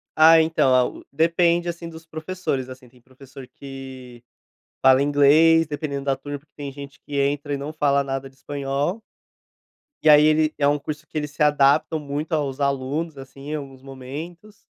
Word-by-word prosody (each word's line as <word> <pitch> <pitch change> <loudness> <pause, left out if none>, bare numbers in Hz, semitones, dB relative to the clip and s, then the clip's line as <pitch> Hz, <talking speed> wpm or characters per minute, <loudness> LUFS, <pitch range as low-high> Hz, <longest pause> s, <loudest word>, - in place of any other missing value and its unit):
Ah, 160 +1 +7
então 160 -5 +2
a 125 -1 +4
u - - -11
depende, 170 +3 +2
assim, 170 0 -6
dos 160 0 -12
professores, 160 -5 -4
assim, 130 -1 -12
tem 125 0 -24
professor 130 +1 -14
que 130 -3 -11 0.6
fala 130 0 +5
inglês 145 +3 +5
dependendo 145 -2 -4
da 135 -1 +1
turma, 145 +2 -7
porque 150 - -35
tem 140 -2 -6
gente 140 0 -11
que 145 - -5
entra 145 +1 -1
e - - -1
não 145 +3 -6
fala 140 -2 +2
nada 135 0 -4
de 135 - -26
espanhol 140 - -3 1.0
e 155 - +5
aí 150 0 +8
ele 155 0 +3
é 140 - +2
um 145 +1 +2
curso 150 +2 -7
que - - -7
ele 150 -1 -2
se 145 +2 -11
adaptam 150 +2 +3
muito 150 +3 -5
aos 145 -3 -1
alunos, 140 +3 -2
assim, 135 +2 -9
alguns 135 -3 -8
momentos, 150 +10 -10
145 Hz, 180 wpm, -22 LUFS, 135-155 Hz, 1.0 s, aí